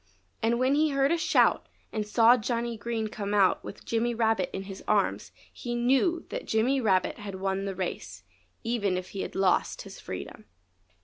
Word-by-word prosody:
And 230 +1 +2
when 255 +2 +2
he 305 +2 +3
heard 275 0 +2
a - - +4
shout 315 -7 +3 0.3
and 215 -1 -2
saw 230 +2 +6
Johnny 235 0 -2
Green 225 0 -3
come 205 -1 -3
out 195 -2 +3
with - - -10
Jimmy 235 +1 0
Rabbit 225 -4 +1
in 195 - -5
his 195 0 -9
arms - - +1 0.2
he 240 -1 -5
knew 270 +8 +2
that - - -5
Jimmy 250 +5 +2
Rabbit 190 -1 +1
had 200 -2 -6
won 195 +1 -2
the 195 -1 -3
race, 95 - -5 0.4
even 205 -6 0
if 185 0 -6
he 195 - -5
had - - -6
lost 190 -2 +1
his - - -11
freedom. - - -8
225 Hz, 185 wpm, -28 LUFS, 195-245 Hz, 0.4 s, saw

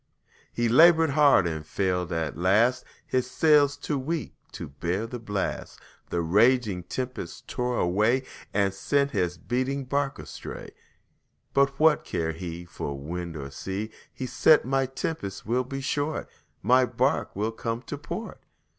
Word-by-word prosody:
He 120 0 0
labored 160 +5 +6
hard 140 - +5
and 80 -2 -3
failed 90 +1 -1
at 80 -3 -2
last, 110 +9 +3 0.2
His 130 -1 -1
sails 145 0 +4
too 145 -3 -2
weak 160 +3 -3 0.2
to - - -6
bear 85 +9 -2
the 120 +1 -6
blast, 105 -4 -4 0.3
The 85 - 0
raging 105 +2 +3
tempests 125 +6 -5
tore 125 0 -2
away 105 +9 +2 0.3
And 100 -1 +1
sent 140 +8 +1
his 90 -7 -1
beating 130 - -2
bark 140 +1 -1
astray. - - -8 0.8
But 140 0 +2
what 160 -1 +5
cared 80 -2 -2
he 85 0 -6
For 70 -4 -5
wind 85 +3 -5
or 70 -1 -7
sea! 95 - -4 0.2
He 130 - -5
said, 155 +4 +5
"The 135 +1 +1
tempest 135 -6 -4
will 125 +3 +1
be 135 +2 -5
short, 145 +2 -2 0.4
My 130 +1 +5
bark 125 - 0
will 105 +3 -1
come 115 +1 -4
to - - -5
port." 215 +10 -6
120 Hz, 150 wpm, -26 LUFS, 90-135 Hz, 0.8 s, labored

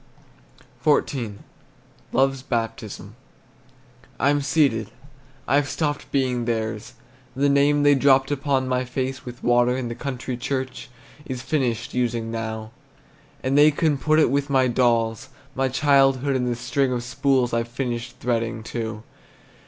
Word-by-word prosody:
XIV. 130 -7 +1 0.8
LOVE'S 135 +1 +2
BAPTISM. 115 -4 -4 1.0
I'm 145 +3 +2
ceded, 135 -8 +1 0.6
I've 145 +1 +2
stopped 145 -3 -2
being 125 -3 0
theirs; 110 -2 -3 0.4
The 140 +2 +2
name 145 +1 +3
they 145 0 +6
dropped 135 0 +4
upon 140 -2 0
my 130 0 0
face 130 +1 -4
With 120 -1 -9
water, 120 +1 +3
in 125 -2 -3
the - - -3
country 130 0 -5
church, 130 0 -4 0.4
Is 130 -2 -5
finished 130 -3 -1
using 120 -2 -1
now, 110 -1 -5 0.7
And 130 +1 0
they 145 +1 +7
can 150 -1 +1
put 155 +2 +2
it 155 -6 +4
with 140 +1 0
my 130 -2 +3
dolls, 120 0 +1 0.2
My 135 0 0
childhood, 135 0 +3
and 125 -1 0
the 120 - 0
string 125 +3 0
of 120 -1 -2
spools 125 0 +1
I've 115 0 0
finished 120 -1 -4
threading 115 -2 -1
too. 110 -2 -5
130 Hz, 135 wpm, -23 LUFS, 120-140 Hz, 1.0 s, they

